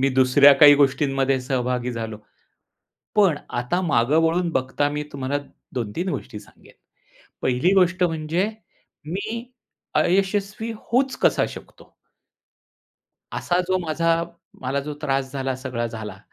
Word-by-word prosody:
मी 135 - +3
दुसऱ्या 130 +2 +7
काही 145 -1 +10
गोष्टींमध्ये 135 -1 +2
सहभागी 125 -1 -2
झालो. 115 -2 -5 1.0
पण 195 -7 +4 0.2
आता 125 +9 -1
मागं 145 -3 +2
वळून 170 +2 +1
बघता 130 +2 0
मी 150 0 -3
तुम्हाला 140 +1 -2 0.4
2-3 125 - -3
गोष्टी 110 - -5
सांगेन. 105 - -19 0.7
पहिली 130 +9 +2
गोष्ट 185 -1 +3
म्हणजे 165 +3 0 0.6
मी 220 +6 -4 0.5
अयशस्वी 200 +4 +1
होऊच 260 +5 0
कसा - - +3
शकतो! - - -13 1.4
असा 175 - 0
जो 185 0 +2
माझा, 165 0 0 0.4
मला 135 +2 -1
जो 150 +2 -6
त्रास 135 -2 -1
झाला, 135 -1 -2
सगळा 125 -3 -3
झाला, 110 -4 -7
145 Hz, 120 wpm, -23 LUFS, 130-180 Hz, 1.4 s, काही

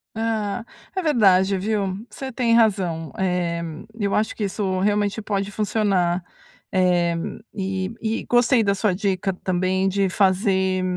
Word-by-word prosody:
Ah, 220 -1 -2 0.3
é 375 - 0
verdade 200 - +4
viu, 195 -1 -1 0.2
você 265 -1 -7
tem 235 -1 +1
razão. 185 - +2
Eh, 180 -2 -1 0.4
eu 200 -1 0
acho 215 +1 +1
que 215 - -3
isso 190 -1 -1
realmente 205 +2 +1
pode 200 -1 -2
funcionar. 195 -5 +1 0.5
Eh, 175 -2 +2 0.4
e 190 +1 -3
e 225 0 -1
gostei 240 0 +4
da 200 -1 +2
sua 200 0 +1
dica 195 0 -1
também 185 +1 +1
de 195 0 +1
fazer, 190 0 +2
195 Hz, 135 wpm, -23 LUFS, 185-215 Hz, 0.5 s, verdade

